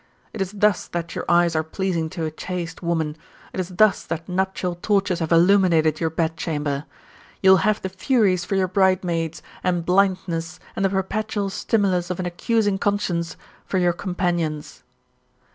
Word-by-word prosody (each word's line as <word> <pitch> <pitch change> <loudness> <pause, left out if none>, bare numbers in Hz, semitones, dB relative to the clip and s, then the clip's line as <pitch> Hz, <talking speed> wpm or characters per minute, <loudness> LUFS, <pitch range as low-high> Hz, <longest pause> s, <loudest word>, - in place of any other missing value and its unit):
It 220 - -4
is 195 +1 -2
thus 210 -1 +2
that 170 -1 -4
your - - -4
eyes 175 -1 +4
are 155 - +3
pleasing 165 0 -2
to 165 -1 -4
a 155 - -3
chaste 175 +1 -5
woman, 165 -3 -1 0.4
it - - -4
is 185 -1 -2
thus 200 +3 +3
that 165 -1 -4
nuptial 185 -1 -1
torches 195 0 0
have 165 -1 -2
illuminated 170 -3 +4
your 165 - +1
bedchamber. 155 -3 -2 0.6
You 190 - +7
will 190 - +8
have 215 +3 +1
the - - 0
Furies 190 -2 +2
for 195 - -2
your 190 -1 +2
bridemaids, 180 -4 +1 0.2
and 175 -2 0
blindness, 180 -2 +1 0.2
and 195 - -1
the 195 - +3
perpetual 200 +1 -2
stimulus 190 -4 0
of 180 - -3
an 185 - -2
accusing 205 +3 0
conscience, 180 -5 -1 0.3
for 190 - -1
your 175 -1 +3
companions.' 175 -4 -2
180 Hz, 165 wpm, -23 LUFS, 165-195 Hz, 0.6 s, will